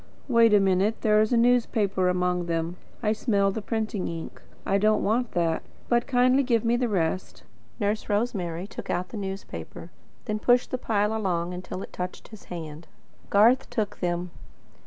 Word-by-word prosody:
"Wait 230 -3 +5
a 210 - +6
minute. 195 +3 +2
There 215 -1 +4
is 215 - +1
a 240 - +4
newspaper 225 -6 +2
among 180 -1 0
them. 165 +1 -2 0.3
I 215 0 +2
smell 200 -3 +1
the 220 - -4
printing 215 -3 -2
ink. 165 -1 -7 0.2
I 195 +1 +2
don't 215 +1 +3
want 235 +3 0
that. 165 -2 +1 0.3
But 240 0 +2
kindly 255 +1 +4
give 235 -4 +1
me 235 +1 +3
the 240 -1 0
rest." 185 -2 -2 0.4
Nurse 210 +2 -1
Rosemary 195 -5 -1
took 205 - -9
out 180 +1 -1
the 225 - -7
newspaper; 195 -1 -7 0.3
then 215 -2 -2
pushed 245 +2 +3
the 255 - -2
pile 210 -2 0
along, 180 -5 -1
until 185 +1 -6
it - - -11
touched 180 0 -6
his 215 -3 -13
hand. 160 -2 -8 0.4
Garth 235 +6 +4
took 220 -4 -2
them. 175 0 -2
205 Hz, 175 wpm, -26 LUFS, 180-230 Hz, 0.4 s, a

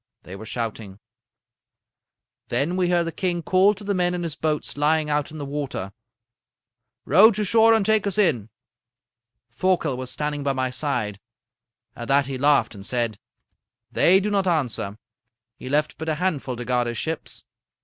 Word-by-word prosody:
they 90 - -9
were 110 +3 -9
shouting. 110 -3 -5 1.5
"Then 140 +9 0
we 180 -1 +1
heard 175 -1 +2
the 165 - -3
king 175 0 -2
call 190 +5 +4
to 200 - -10
the 200 0 -1
men 180 -1 +1
in 175 - -3
his 165 -3 -3
boats 155 -1 -2
lying 150 +1 +1
out 145 -1 0
in 155 - -10
the 145 - -5
water: 140 -9 -4 1.1
"'Row 195 - +7
to 215 -1 -1
shore 225 +3 +5
and 215 -3 +1
take 220 -1 +2
us 200 - -3
in.' 140 - +1 1.0
"Thorkel 175 -8 0
was 130 -1 -5
standing 150 +1 -3
by 140 -1 0
my 130 -1 -1
side. 125 -7 -3 0.8
At 120 - -7
that 140 0 +3
he 135 -1 -5
laughed 140 -5 +3
and 100 -2 -10
said: 115 -2 -2 0.7
"'They 190 +3 +4
do 210 +2 -2
not 195 -2 +1
answer. 125 - -1 0.6
He 130 - -9
left 150 +2 0
but 160 0 -3
a 155 - 0
handful 150 -7 -2
to 120 0 -6
guard 125 -1 +1
his 120 -1 -4
ships. 160 +5 -4
150 Hz, 175 wpm, -23 LUFS, 125-180 Hz, 1.5 s, Row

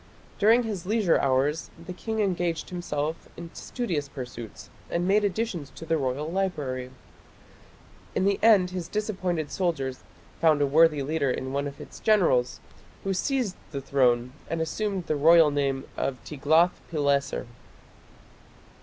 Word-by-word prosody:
During 225 +4 +5
his 200 -6 -4
leisure 210 -5 +3
hours 140 +4 +1
the 170 +2 -8
king 220 +3 -3
engaged 175 -4 -1
himself 160 -3 -3
in 170 -1 -9
studious 170 - -3
pursuits 120 -5 -8 0.2
and 175 +1 -1
made 205 +2 +4
additions 195 -7 -2
to 165 - -8
the 165 0 +1
royal 140 0 -1
library. 145 -10 -2 1.3
In 185 - +1
the 200 0 +2
end 205 -5 +5
his 180 -2 -4
disappointed 185 -7 -2
soldiers 140 -8 -1 0.4
found 155 -3 +4
a 145 - +3
worthy 150 0 +4
leader 145 -1 0
in 130 +1 -3
one 140 +1 -1
of 140 - -9
its - - -10
generals 170 - +2 0.4
who 195 - 0
seized 240 -1 -1
the 140 - -4
throne 125 -2 +2 0.2
and 165 - -2
assumed 190 +3 -2
the 155 - 0
royal 160 +1 +6
name 135 -2 0
of 135 - -2
Tiglath 160 +4 +2
pileser. 140 -3 0
165 Hz, 145 wpm, -26 LUFS, 140-185 Hz, 1.3 s, royal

